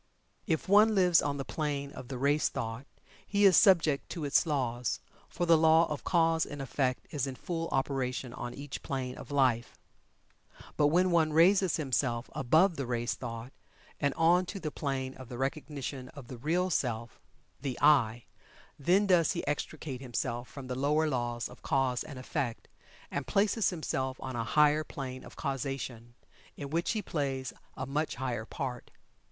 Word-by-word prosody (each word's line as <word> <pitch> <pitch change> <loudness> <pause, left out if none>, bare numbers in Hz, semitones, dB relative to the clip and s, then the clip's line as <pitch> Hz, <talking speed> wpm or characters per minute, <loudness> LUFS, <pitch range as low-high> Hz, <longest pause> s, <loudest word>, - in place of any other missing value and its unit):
If 160 -2 0
one 210 +3 +6
lives 180 -3 +5
on 145 -1 -1
the 135 - -4
plane 145 -3 -3
of 130 - -9
the 130 -1 -5
race 145 +4 +2
thought, 115 +4 -5 0.4
he 205 0 +2
is 190 -3 +7
subject 160 -7 +4
to 165 -4 -4
its 145 +4 +3
laws, 125 -5 -1 0.3
for 175 - -2
the 165 -1 +6
law 160 +1 +6
of 150 - -4
cause 165 -2 +3
and 145 - -6
effect 130 -1 -1
is 140 -2 -1
in 135 - -5
full 165 +3 -3
operation 130 -2 -1
on 120 0 -6
each 140 0 -7
plane 130 -2 -3
of - - -10
life. 130 -4 +1 1.0
But 145 - +4
when 180 +4 +3
one 160 -2 +3
raises 185 +2 +5
himself 130 -4 -1
above 160 +7 +3
the 140 -3 -3
race 120 0 -1
thought, 115 +1 -7 0.5
and 140 -1 0
on 175 +2 +4
to 195 - -5
the 155 -4 -4
plane 135 -3 -3
of 130 -3 -11
the 120 - -6
Recognition 135 -1 -4
of 135 -5 -10
the 125 - -7
Real 175 +7 0
Self 120 -6 -2 0.4
The 135 -3 -3
"I" 120 -6 +4 0.6
then 185 +8 +3
does 175 -5 +4
he - - -3
extricate 145 -2 -4
himself 120 -1 -3
from 140 -2 -9
the 130 - -4
lower 150 +4 +2
laws 120 -4 -2
of 125 - -15
cause 130 -2 +1
and 145 -4 -9
effect, 130 -2 -3 0.4
and 140 -2 -3
places 205 - +2
himself 130 -6 -2
on 130 -1 -5
a 115 - -1
higher 150 +5 +4
plane 130 -3 -7
of - - -12
causation, 130 -4 -4 0.4
in 140 -1 -6
which 170 +6 0
he 215 -2 -2
plays 135 -6 -2 0.2
a 130 - -3
much 150 +3 -2
higher 120 -4 -3
part. 125 -2 -5
140 Hz, 175 wpm, -30 LUFS, 125-160 Hz, 1.0 s, is